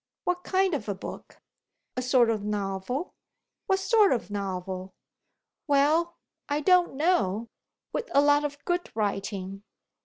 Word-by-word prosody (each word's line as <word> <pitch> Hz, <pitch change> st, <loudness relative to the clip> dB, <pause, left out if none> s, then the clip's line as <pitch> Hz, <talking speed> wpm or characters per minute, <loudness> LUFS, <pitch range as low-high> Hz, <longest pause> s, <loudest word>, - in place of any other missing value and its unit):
"What 360 Hz, 0 st, -1 dB
kind 380 Hz, -1 st, +2 dB
of 220 Hz, -8 st, -2 dB
a 200 Hz, -, -1 dB
book?" 190 Hz, -, -9 dB, 0.6 s
"A 255 Hz, -, -1 dB
sort 250 Hz, -2 st, +4 dB
of 215 Hz, -2 st, -2 dB
novel." 205 Hz, -, -3 dB, 0.5 s
"What 385 Hz, -2 st, +3 dB
sort 420 Hz, +1 st, +4 dB
of 235 Hz, -4 st, -1 dB
novel?" 190 Hz, -1 st, -4 dB, 0.7 s
"Well, 310 Hz, +4 st, +3 dB, 0.3 s
I 290 Hz, +1 st, +1 dB
don't 355 Hz, -1 st, +4 dB
know 230 Hz, -, +1 dB, 0.4 s
with 485 Hz, -, -3 dB
a 280 Hz, -, +5 dB
lot 290 Hz, 0 st, +4 dB
of 290 Hz, 0 st, -5 dB
good 350 Hz, 0 st, -1 dB
writing." 195 Hz, -2 st, -2 dB
265 Hz, 135 wpm, -27 LUFS, -, 0.7 s, a